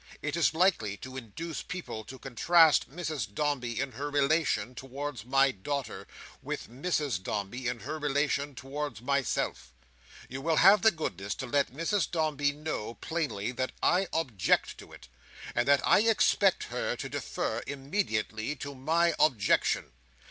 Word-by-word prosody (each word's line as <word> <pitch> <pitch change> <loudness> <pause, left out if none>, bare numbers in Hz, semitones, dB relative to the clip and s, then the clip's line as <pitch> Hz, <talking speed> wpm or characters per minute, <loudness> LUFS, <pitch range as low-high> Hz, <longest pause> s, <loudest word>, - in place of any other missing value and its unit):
It 150 +1 -2
is 170 -2 +2
likely 160 - +2
to 130 +3 -9
induce 130 +5 -6
people 170 -12 -6
to 130 - -9
contrast 155 +6 +4
Mrs 150 - -4
Dombey 130 -5 -1
in 135 - -1
her 140 +5 -4
relation 145 -5 +1
towards 135 -2 -6
my 135 +1 +4
daughter, 140 +7 -4 0.3
with - - -5
Mrs 140 - -1
Dombey 105 +6 -3
in 120 -1 -3
her 155 - -5
relation 145 -1 0
towards 145 +1 -5
myself. 135 - -1 0.6
You 130 +1 -6
will 160 +2 +1
have 195 +5 +7
the 220 - +7
goodness 100 - -4
to - - -5
let 140 +1 +1
Mrs 165 +8 0
Dombey 150 -4 +1
know, 145 -7 -5
plainly, 145 -10 -2
that 130 +1 -3
I 185 +2 +3
object 125 - +1
to - - -12
it; - - -13 0.5
and 120 +2 +1
that 140 -1 +4
I - - +6
expect 210 -3 +3
her - - -1
to - - -5
defer, - - -3
immediately, 135 - -2
to 140 +1 -6
my 165 +6 +2
objection. 110 -10 +2
140 Hz, 150 wpm, -29 LUFS, 120-160 Hz, 0.6 s, have